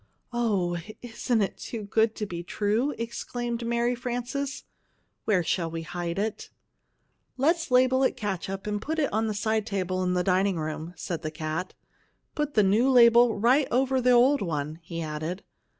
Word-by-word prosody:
"Oh, 195 -8 0 0.2
isn't 230 -1 0
it 195 - -3
too 225 -3 -6
good 220 +2 +1
to 210 - -3
be 175 -3 -5
true!" 210 +8 0
exclaimed 235 +1 -4
Mary 235 +1 +1
Frances. 245 +3 -4 0.6
"Where 190 -5 +2
shall 165 0 -1
we 165 0 -5
hide 170 +1 -4
it?" 210 +1 -3 0.9
"Let's 325 +5 +1
label 255 +1 +4
it 265 - +2
CATSUP 195 -1 -4
and 210 -1 -2
put 320 +6 -3
it 295 -8 0
on 220 +1 +1
the 215 - -2
side 220 +1 0
table 185 -3 -1
in 180 0 0
the 180 - +1
dining 190 +1 +2
room," 155 +2 -5
said 165 -1 -4
the 155 - -3
cat. 155 +3 -4 0.6
"Put 295 -1 -2
the 210 - +5
new 215 +7 +3
label 235 -2 +6
right 255 +7 +3
over 260 +1 +2
the 250 - +3
old 250 +4 +5
one," 155 -3 -3
he 165 0 -5
added. 155 +4 -4
215 Hz, 170 wpm, -27 LUFS, 180-245 Hz, 0.9 s, label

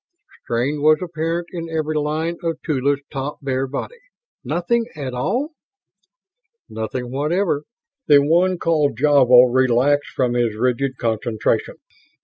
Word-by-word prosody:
Strain 130 +6 -1
was 155 +1 +5
apparent 170 -1 -3
in 165 -2 -6
every 155 -1 -2
line 155 +3 -1
of 165 -2 -3
Tula's 140 -1 0
taut, 140 +1 -4
bare 135 0 -1
body. 470 - -6 0.4
"Nothing 175 - 0
at 135 -4 -5
all?" 210 - -1 1.2
"Nothing 115 +3 -5
whatever." 150 +2 0 0.4
The 145 - +7
one 175 +6 +2
called 155 -4 +1
Javo 125 -4 +5
relaxed 130 +3 +2
from 125 -2 -1
his 120 -3 0
rigid 125 +3 -1
concentration. 110 -1 -1
145 Hz, 125 wpm, -20 LUFS, 125-165 Hz, 1.2 s, The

